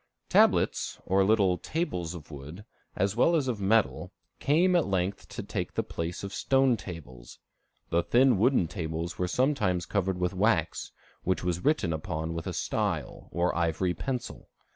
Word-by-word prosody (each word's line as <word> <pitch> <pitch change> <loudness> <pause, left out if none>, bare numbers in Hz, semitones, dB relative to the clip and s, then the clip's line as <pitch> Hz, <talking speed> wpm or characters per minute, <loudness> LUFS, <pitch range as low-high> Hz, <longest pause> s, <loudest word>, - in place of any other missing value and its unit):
Tablets, - - +3
or 95 +2 +3
little 95 -3 +3
tables 90 - -3
of 80 -2 -11
wood, 75 +8 -9 0.3
as 100 +2 0
well 165 +8 +4
as 145 -5 +1
of 115 -5 -2
metal, 105 +2 +1 0.3
came 175 +6 +3
at 170 - +3
length 95 0 -1
to - - -6
take - - -4
the - - +1
place 85 +3 -5
of 100 - -5
stone 135 -2 +3
tables. 70 - -10 0.5
The 85 - +3
thin 125 +1 +4
wooden 120 -5 +3
tables 80 -1 -4
were 90 - +1
sometimes 105 -5 +1
covered 95 -2 -1
with 90 +1 0
wax, 95 -4 +1 0.3
which 95 -1 -1
was 90 -1 -1
written 140 - +2
upon 80 +1 -3
with 85 -1 -5
a - - -3
style, - - -2
or 85 +1 0
ivory 85 +2 0
pencil. 125 +7 -5
95 Hz, 165 wpm, -28 LUFS, 85-115 Hz, 0.5 s, well